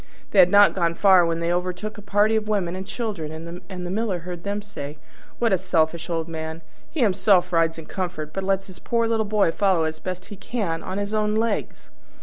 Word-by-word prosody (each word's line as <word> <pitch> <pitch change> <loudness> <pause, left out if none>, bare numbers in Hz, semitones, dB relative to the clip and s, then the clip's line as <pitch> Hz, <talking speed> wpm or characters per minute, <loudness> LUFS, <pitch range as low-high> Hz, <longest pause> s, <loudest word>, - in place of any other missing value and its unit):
They 200 - +4
had 180 -1 +8
not 205 +1 +6
gone 170 -3 0
far 190 -1 +6
when 165 0 -1
they 170 +1 +1
overtook 180 +4 -3
a 210 - -9
party 205 +2 +2
of 215 -1 0
women 190 -5 0
and 190 +1 -6
children, 200 -9 -4 0.4
and 180 -2 -6
the 175 - -4
Miller 200 -3 -1
heard 175 0 -7
them 205 +1 -3
say, 150 -8 -7 0.4
"What 230 -4 +2
a 190 - +3
selfish 170 -2 0
old 165 -1 -1
man! 160 0 -6 0.3
He 310 - -3
himself 195 -4 +3
rides 165 -1 +2
in 160 - -8
comfort, 165 -5 -4
but 195 - -3
lets 195 0 0
his 185 - -12
poor 230 -1 0
little 225 -2 0
boy 205 -5 +3
follow 190 -3 +2
as 160 0 -3
best 185 0 -5
he - - -8
can 190 -7 -3
on 185 - -5
his 205 +1 -3
own 210 0 +1
legs!" 225 -1 -2
185 Hz, 220 wpm, -24 LUFS, 170-210 Hz, 0.4 s, had